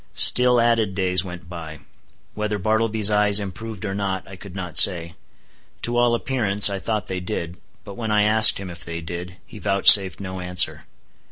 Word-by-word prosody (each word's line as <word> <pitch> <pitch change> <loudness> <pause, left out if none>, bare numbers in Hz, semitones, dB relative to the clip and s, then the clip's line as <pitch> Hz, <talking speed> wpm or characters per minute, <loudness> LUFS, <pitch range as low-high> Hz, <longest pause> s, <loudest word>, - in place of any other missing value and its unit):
Still 125 -1 +4
added 115 -4 -1
days 90 -2 -1
went 85 -3 -12
by. 80 -3 -10 0.6
Whether 105 0 -5
Bartleby's 110 +1 0
eyes 105 0 +2
improved 105 +1 -9
or 100 - -5
not, 95 -2 -5
I 100 - -12
could 95 0 -14
not 90 -5 -8
say. 85 0 +4 0.7
To 120 - -3
all 120 0 +1
appearance, 105 -6 +3
I 100 - -5
thought 105 +1 -5
they 95 -1 -6
did. 90 -2 -7 0.3
But 100 - -11
when 110 -2 -6
I 105 -1 0
asked 110 +1 +5
him 95 -2 -9
if 85 0 -12
they 85 -1 -8
did, 90 +3 -9
he 105 - -14
vouchsafed 100 -1 +4
no 95 -1 -8
answer. 90 -1 0
100 Hz, 180 wpm, -20 LUFS, 90-110 Hz, 0.7 s, asked